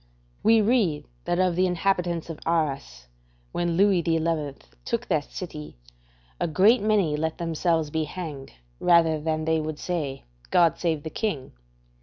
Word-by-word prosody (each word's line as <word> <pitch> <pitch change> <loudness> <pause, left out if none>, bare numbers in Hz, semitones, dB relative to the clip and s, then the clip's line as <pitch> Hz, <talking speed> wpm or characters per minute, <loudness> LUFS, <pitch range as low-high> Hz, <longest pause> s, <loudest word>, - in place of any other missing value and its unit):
We 225 0 +5
read 205 -9 +1 0.2
that 175 - 0
of 185 -2 +2
the 185 +1 +3
inhabitants 175 -2 0
of 155 - -9
Arras, 145 - -1 0.5
when 170 -1 -1
Louis 195 -2 +4
XI. 160 -3 0 0.3
took - - -2
that - - +1
city, - - -8 0.6
a - - 0
great 200 - +4
many 205 -8 +2
let 160 +1 -2
themselves 165 -2 0
be 160 0 0
hanged 150 -4 -7 0.3
rather 165 -3 +4
than 155 0 -1
they 160 0 +2
would 155 -1 -4
say, 150 -7 -3 0.3
"God 170 -2 +3
save 160 -4 -1
the 160 - -6
King." 165 - -3
165 Hz, 150 wpm, -25 LUFS, 155-180 Hz, 0.6 s, We